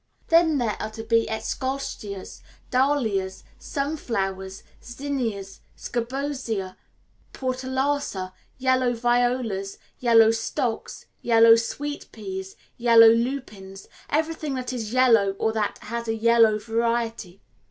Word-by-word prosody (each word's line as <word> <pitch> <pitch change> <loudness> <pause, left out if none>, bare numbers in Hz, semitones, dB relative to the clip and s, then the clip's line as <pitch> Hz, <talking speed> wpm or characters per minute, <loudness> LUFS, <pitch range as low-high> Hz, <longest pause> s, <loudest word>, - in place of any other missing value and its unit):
Then 330 -2 +4
there 230 -5 -1
are 215 - -3
to 225 0 -7
be 230 0 +2
eschscholtzias, 220 -4 -4 0.3
dahlias, 230 -8 0 0.2
sunflowers, 195 - -3 0.2
zinnias, 240 -7 -4 0.2
scabiosa, 240 -6 -3 0.6
portulaca, 260 -6 -2 0.2
yellow 255 -1 +2
violas, 240 -4 0 0.2
yellow 225 -2 +6
stocks, 225 +1 -3 0.2
yellow 230 -1 +6
sweet 290 +6 -4
peas, 190 -3 -7 0.2
yellow 230 -1 +7
lupins 225 -5 -2 0.2
everything 310 -2 -1
that 255 0 -4
is 225 -4 -4
yellow 230 -6 +4
or 220 +2 0
that 215 -2 -1
has 235 0 -5
a 225 - 0
yellow 225 -1 +4
variety. 230 -3 -2
230 Hz, 100 wpm, -24 LUFS, 215-260 Hz, 0.6 s, yellow